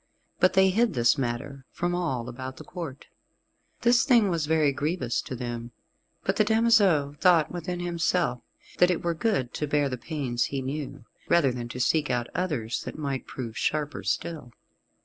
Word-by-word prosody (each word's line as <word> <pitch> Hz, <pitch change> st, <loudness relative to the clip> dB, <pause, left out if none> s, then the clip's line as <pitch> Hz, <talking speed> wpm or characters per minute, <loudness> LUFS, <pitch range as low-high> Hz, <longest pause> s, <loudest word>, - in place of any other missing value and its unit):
But 185 Hz, -, +4 dB
they 190 Hz, 0 st, +5 dB
hid 225 Hz, 0 st, +2 dB
this 120 Hz, -1 st, +4 dB
matter 135 Hz, +1 st, -4 dB
from 175 Hz, 0 st, -2 dB
all 135 Hz, -10 st, -1 dB
about 130 Hz, +1 st, -7 dB
the -, -, -9 dB
Court. 155 Hz, -6 st, -7 dB, 0.8 s
This 240 Hz, +2 st, +4 dB
thing 235 Hz, -7 st, +4 dB
was 165 Hz, -4 st, -1 dB
very 155 Hz, -2 st, +3 dB
grievous 145 Hz, -3 st, -1 dB
to 130 Hz, -, -6 dB
them, 120 Hz, -1 st, -5 dB, 0.5 s
but 190 Hz, +1 st, 0 dB
the 215 Hz, -, +5 dB
damoiseau 210 Hz, -10 st, +3 dB
thought 175 Hz, -4 st, +4 dB
within 175 Hz, 0 st, -4 dB
himself 170 Hz, -6 st, 0 dB, 0.4 s
that 180 Hz, -, +6 dB
it 180 Hz, -, 0 dB
were 170 Hz, 0 st, +1 dB
good 160 Hz, -, -1 dB
to 150 Hz, -, -2 dB
bear 145 Hz, -1 st, +1 dB
the 130 Hz, -2 st, -4 dB
pains 135 Hz, -7 st, -2 dB
he 140 Hz, -, -3 dB
knew, 140 Hz, -1 st, -5 dB, 0.2 s
rather 160 Hz, -6 st, +4 dB
than 120 Hz, -1 st, -5 dB
to 125 Hz, -, -6 dB
seek 150 Hz, +4 st, +2 dB
out 120 Hz, -1 st, -1 dB
others 150 Hz, -11 st, -2 dB
that -, -, -7 dB
might 140 Hz, -3 st, -3 dB
prove 115 Hz, -4 st, -6 dB
sharper 150 Hz, +3 st, -1 dB
still. 155 Hz, -8 st, -3 dB
150 Hz, 175 wpm, -27 LUFS, 130-175 Hz, 0.8 s, that